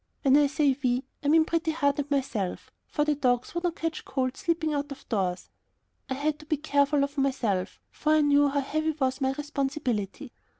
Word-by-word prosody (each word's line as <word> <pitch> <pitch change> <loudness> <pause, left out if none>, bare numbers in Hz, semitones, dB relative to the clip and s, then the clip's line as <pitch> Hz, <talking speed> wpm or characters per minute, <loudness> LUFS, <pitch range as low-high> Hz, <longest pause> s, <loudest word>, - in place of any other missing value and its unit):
When 275 -2 +5
I 290 0 +5
say 280 -1 +2
"we," 250 +1 +1 0.2
I - - -1
mean 315 +2 +5
Pretty 330 0 0
Heart 285 -3 +1
and 290 0 -2
myself, 260 -9 -2 0.2
for 295 - 0
the 300 - +2
dogs 250 -4 0
would 345 +1 -3
not 345 -2 0
catch 325 -1 -3
cold 255 -1 -2
sleeping 325 -2 -1
out 290 0 -2
of 275 - -9
doors. 185 -5 -1 0.6
I 265 - -1
had 295 +2 -1
to 305 - -14
be 310 -2 +1
careful 285 -1 +2
of 280 0 -3
myself, 225 -9 0
for 305 0 +1
I 310 - +5
knew 290 0 +4
how 285 0 0
heavy 310 +3 -1
was 265 -2 -1
my 265 0 +1
responsibility. 275 -5 -3
285 Hz, 205 wpm, -27 LUFS, 265-305 Hz, 0.6 s, When